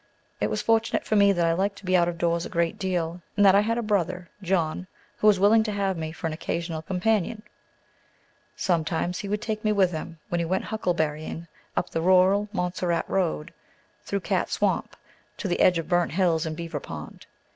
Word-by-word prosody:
It - - 0
was 210 - -2
fortunate 225 0 +1
for 215 - 0
me 200 -1 +6
that 175 -3 +1
I 165 - +3
liked 200 +3 0
to 200 - -13
be 185 0 +2
out 175 -1 +4
of 170 - -5
doors 170 0 +1
a - - -6
great 170 -2 -1
deal, 175 -2 -2 0.2
and 205 - +5
that 190 - +8
I 200 - +6
had 230 +2 0
a 235 - -1
brother, 180 -4 -1
John, 180 -1 -1 0.3
who 215 - +2
was 205 -3 +5
willing 210 +3 +5
to 215 - -1
have 200 -2 0
me 160 -1 -4
for 165 - -8
an 160 - -1
occasional 165 0 -3
companion. 210 +4 0 1.1
Sometimes 175 0 0
he 200 - -5
would 210 +1 -2
take 215 -1 -3
me 215 - +2
with 195 -3 +3
him 165 0 -6
when 175 - 0
he 170 - 0
went 185 +3 -1
huckleberrying, 160 -5 -2 0.3
up - - -1
the 165 - -1
rural 190 +3 +4
Montserrat 180 -3 -1
Road, 75 - -1 0.5
through 200 0 -2
Cat - - 0
Swamp, - - 0 0.4
to 205 - -3
the 175 - -1
edge 180 -2 +5
of 165 -2 -3
Burnt 175 -3 +1
Hills 170 -3 +2
and 155 -1 -4
Beaver 170 -1 -4
Pond. - - -9
180 Hz, 210 wpm, -26 LUFS, 170-200 Hz, 1.1 s, that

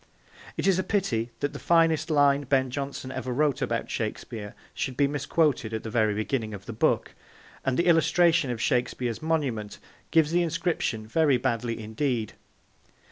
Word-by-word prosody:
It - - -1
is 190 -2 +3
a - - +1
pity 130 - 0
that 145 0 -1
the 140 - -7
finest 165 -1 +3
line 145 -2 +3
Ben 130 -1 +1
Jonson 140 -1 -4
ever 130 -1 -4
wrote 145 +2 +1
about - - -2
Shakespeare 105 -2 -4 0.2
should 130 -2 -3
be 145 - +4
misquoted 140 -4 0
at 110 - -4
the 110 - -6
very 110 -3 +2
beginning 110 0 -2
of 100 0 -11
the 115 - -6
book, 110 - +1 0.5
and 130 -1 0
the 170 - +2
illustration 170 -2 +4
of 120 -2 -3
Shakespeare's 120 -2 -1
monument 135 -10 -1 0.3
gives 160 -2 +3
the 175 +1 +3
inscription 165 - -1
very 145 +3 +3
badly 120 -2 -2
indeed. 110 +1 -2
135 Hz, 165 wpm, -27 LUFS, 115-160 Hz, 0.5 s, be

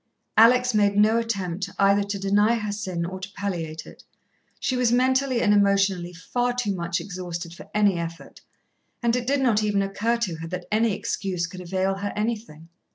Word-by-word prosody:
Alex 250 +2 +5
made 205 -1 +2
no 215 +2 +4
attempt 200 -4 -3
either 200 +1 +4
to 200 0 -3
deny 205 +3 +3
her 210 -2 -3
sin 185 -4 -3
or 185 +2 -6
to 185 +1 -8
palliate 165 -6 -4
it. - - -14 0.6
She 255 - -1
was 250 -2 +2
mentally 260 0 +2
and 210 - +4
emotionally 195 -3 +2
far 245 +8 -2
too 245 -5 -1
much 170 -2 -2
exhausted 175 -3 -6
for - - -13
any 205 -4 +2
effort, 165 0 -7 0.6
and 235 0 +2
it 245 -1 -2
did 280 +1 +2
not 230 -5 +3
even 205 -2 +1
occur 215 +4 0
to 190 -9 -2
her 165 +1 -6
that 180 +1 -5
any 220 0 +2
excuse 185 -3 -2
could 180 +2 -9
avail 190 +2 -1
her 200 +1 -3
anything. 210 -7 -4
200 Hz, 185 wpm, -24 LUFS, 180-230 Hz, 0.6 s, Alex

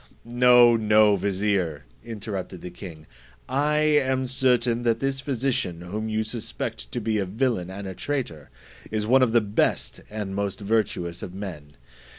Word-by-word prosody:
"No, 120 0 +6
no, 105 -1 +4
vizier," 95 -6 -1 0.2
interrupted 100 -5 -6
the 90 - -7
king; 80 -5 -10 0.4
"I 145 +4 +1
am 145 -4 +2
certain, 125 -2 +2
that 115 -1 +1
this 135 0 -1
physician, 130 - -1
whom 105 +5 -4
you 110 0 0
suspect 110 - -5
to - - -1
be 110 -1 -1
a 100 - 0
villain 110 -3 -1
and 100 +1 -7
a 95 - -5
traitor, 105 - -4 0.4
is 110 -1 -2
one 130 +4 +4
of 125 -3 +3
the 120 0 +4
best 105 0 0
and 105 -2 -5
most 100 0 -2
virtuous 100 -5 -1
of 90 - -7
men. 80 -8 -8
110 Hz, 160 wpm, -25 LUFS, 95-125 Hz, 0.4 s, No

